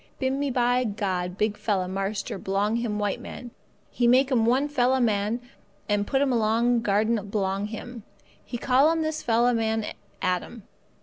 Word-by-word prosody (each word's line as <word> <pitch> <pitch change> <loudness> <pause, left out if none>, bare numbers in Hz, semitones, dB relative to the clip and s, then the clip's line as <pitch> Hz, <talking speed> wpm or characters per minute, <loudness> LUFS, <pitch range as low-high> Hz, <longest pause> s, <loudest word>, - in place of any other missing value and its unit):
"Bimeby 255 -4 0
God 185 -3 -2
big 210 +1 0
fella 195 -4 -1
marster 195 +1 -3
belong 205 +5 0 0.2
white 205 -1 -1
man 245 -1 -9 0.4
He 240 - +1
make 260 +3 +4
'm 230 -3 +3
one 260 +4 +3
fella 260 -2 +2
man 215 -1 +1 0.5
and 205 -1 0
put 270 0 +2
'm 265 -2 +1
along 230 +1 +2
garden 215 +1 +1
belong 195 0 -1
Him. 230 +2 -8 0.4
He 240 - -5
call 265 +5 +4
'm 325 0 +1
this 310 0 -2
fella 240 +1 +2
man 220 -1 0 0.3
Adam. 185 +4 -2
230 Hz, 150 wpm, -26 LUFS, 205-250 Hz, 0.5 s, make